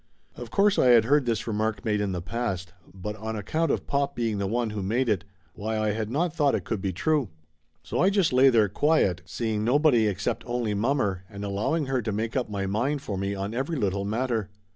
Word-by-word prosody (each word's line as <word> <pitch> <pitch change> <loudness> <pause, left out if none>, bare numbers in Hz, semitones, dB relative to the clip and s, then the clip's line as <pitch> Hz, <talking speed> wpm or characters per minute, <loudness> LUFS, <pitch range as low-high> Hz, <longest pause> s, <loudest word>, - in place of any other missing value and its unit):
Of - - -8
course 200 0 +3
I - - +4
had 120 -3 +6
heard 140 0 +3
this 115 -2 0
remark 110 +1 -2
made 105 -2 +1
in 100 -2 -1
the 90 -2 -4
past, 95 -4 -3 0.2
but 95 +3 -6
on 110 0 -4
account 155 +11 -1
of - - -1
pop 140 0 -1
being 115 -4 -1
the 100 - -1
one 115 +1 -1
who 105 -1 -4
made 115 +7 0
it, 100 -6 0 0.3
why 110 +2 -3
I 110 -1 +1
had 110 0 -3
not 155 +6 0
thought 145 -5 +2
it - - -2
could 105 - -3
be 95 - -1
true. 140 - 0 0.5
So 90 - -3
I 185 - +5
just 195 -8 +2
lay 130 +2 +6
there 110 -4 +4
quiet, 100 - +2
seeing 110 +3 -2
nobody 125 -2 +4
except 100 0 -2
only 120 -3 -1
mommer, 105 -4 0
and 100 -1 -6
allowing 105 +11 0
her 130 -1 0
to 110 - -3
make 110 +3 -2
up 125 -4 -1
my 100 -2 -2
mind 125 +9 -1
for 100 - -4
me 100 +1 -2
on 100 +2 -4
every 135 +7 -2
little 100 -4 0
matter. 110 -1 -1
110 Hz, 230 wpm, -26 LUFS, 100-130 Hz, 0.5 s, had